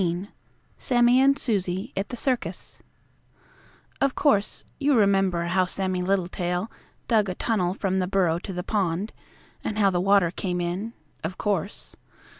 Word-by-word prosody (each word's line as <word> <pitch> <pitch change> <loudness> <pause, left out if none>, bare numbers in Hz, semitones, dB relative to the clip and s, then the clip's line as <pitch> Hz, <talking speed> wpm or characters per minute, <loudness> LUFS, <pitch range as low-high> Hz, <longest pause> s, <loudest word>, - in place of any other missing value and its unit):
XV 175 +2 -1 0.5
SAMMIE 245 0 +4
AND 275 +1 +4
SUSIE 200 -2 -2
AT 195 +1 -2
THE - - -4
CIRCUS 255 0 -3 1.2
Of 275 -1 +2
course, 210 -9 +1
you 285 -1 +3
remember 195 -5 +3
how 185 +2 +2
Sammie 185 0 -2
Littletail 180 +1 -1 0.4
dug 215 -4 +3
a 180 - -3
tunnel 185 -5 0
from 190 -2 0
the 180 - 0
burrow 180 -3 +2
to 195 - -7
the 180 -1 -4
pond, 195 0 -1 0.5
and 210 - -3
how 200 -2 +4
the 175 -1 0
water 195 -3 +4
came 180 -1 -3
in. 180 +6 -3 0.3
Of 180 +4 -4
course. 200 -1 -3
195 Hz, 150 wpm, -25 LUFS, 180-215 Hz, 1.2 s, SAMMIE